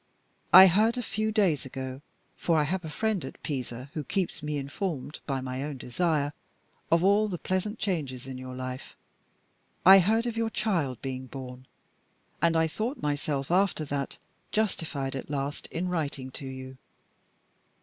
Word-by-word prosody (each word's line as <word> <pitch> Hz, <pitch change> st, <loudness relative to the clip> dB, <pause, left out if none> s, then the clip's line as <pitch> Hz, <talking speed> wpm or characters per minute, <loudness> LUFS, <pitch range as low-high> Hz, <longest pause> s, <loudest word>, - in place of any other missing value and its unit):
I 185 Hz, +2 st, +12 dB
heard 215 Hz, +6 st, +4 dB
a 245 Hz, -, -1 dB
few 215 Hz, +1 st, -1 dB
days 195 Hz, -, +2 dB
ago 130 Hz, 0 st, -6 dB, 0.3 s
(for 165 Hz, -2 st, +1 dB
I 150 Hz, -, +4 dB
have 180 Hz, +5 st, -1 dB
a 160 Hz, -, -5 dB
friend 215 Hz, +2 st, 0 dB
at 130 Hz, -, -8 dB
Pisa 130 Hz, -2 st, -4 dB
who 155 Hz, -, -3 dB
keeps 180 Hz, +2 st, -2 dB
me 150 Hz, 0 st, -2 dB
informed, 145 Hz, +1 st, -4 dB
by 135 Hz, -2 st, -1 dB
my 130 Hz, 0 st, -4 dB
own 145 Hz, -2 st, -4 dB
desire, 145 Hz, +3 st, 0 dB, 0.6 s
of 165 Hz, +1 st, +4 dB
all 205 Hz, +3 st, +5 dB
the 185 Hz, -4 st, -3 dB
pleasant 185 Hz, +5 st, -2 dB
changes 145 Hz, -, -2 dB
in 130 Hz, -1 st, -6 dB
your 130 Hz, 0 st, -7 dB
life) 130 Hz, 0 st, -6 dB, 0.9 s
I 190 Hz, +2 st, +11 dB
heard 220 Hz, +6 st, +3 dB
of 235 Hz, -2 st, -2 dB
your 225 Hz, 0 st, 0 dB
child 170 Hz, -, 0 dB
being 130 Hz, -1 st, -4 dB
born; 130 Hz, 0 st, -8 dB, 0.7 s
and 165 Hz, -1 st, +4 dB
I 160 Hz, 0 st, +4 dB
thought 230 Hz, -, -3 dB
myself, 145 Hz, -1 st, -1 dB
after 180 Hz, -4 st, +2 dB
that, 140 Hz, -1 st, -3 dB, 0.3 s
justified 160 Hz, -10 st, -1 dB
at 135 Hz, -, -5 dB
last 140 Hz, 0 st, -3 dB
in 180 Hz, +2 st, -3 dB
writing 145 Hz, -6 st, -2 dB
to 135 Hz, -, -6 dB
you. 130 Hz, 0 st, -8 dB
150 Hz, 165 wpm, -28 LUFS, 135-190 Hz, 0.9 s, I